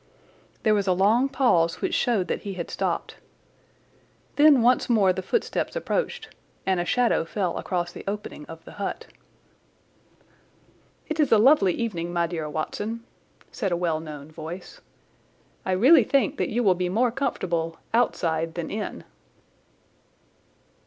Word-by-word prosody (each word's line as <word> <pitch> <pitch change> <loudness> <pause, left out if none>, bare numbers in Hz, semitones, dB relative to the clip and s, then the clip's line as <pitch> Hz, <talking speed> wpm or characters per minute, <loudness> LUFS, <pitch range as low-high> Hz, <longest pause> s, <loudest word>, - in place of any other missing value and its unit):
There 215 - +4
was 200 -2 0
a 185 - +4
long 215 +8 +3
pause 180 -11 +2
which - - -2
showed 220 -7 +1
that - - -2
he 200 -2 -5
had 170 -2 -5
stopped. - - -2 1.2
Then 290 -4 +6
once 250 +1 +3
more 200 -6 +4
the 190 - -4
footsteps 470 - -1
approached 485 -2 -2 0.4
and 190 -2 +1
a 175 - -1
shadow 245 -3 +2
fell 180 +1 -2
across 175 -2 -2
the - - -10
opening 205 -7 -5
of 165 0 -11
the - - -11
hut. 195 - -3 2.0
"It 315 0 -4
is 295 - +3
a 225 - +7
lovely 215 - +5
evening, 175 -7 -3
my 170 -1 +1
dear 160 -3 -4
Watson," 210 +9 -4 0.5
said 200 -6 -2
a 175 - +1
well 170 -3 0
known 150 -1 -9
voice. 165 +4 -9 0.9
"I 190 - +1
really 260 - +6
think 275 +5 +1
that - - -1
you 240 +2 0
will 195 -4 +5
be 180 0 -2
more 235 +6 +2
comfortable 170 -11 -2 0.2
outside 165 -8 0
than 170 -2 -4
in." 210 0 -5
195 Hz, 150 wpm, -25 LUFS, 170-240 Hz, 2.0 s, a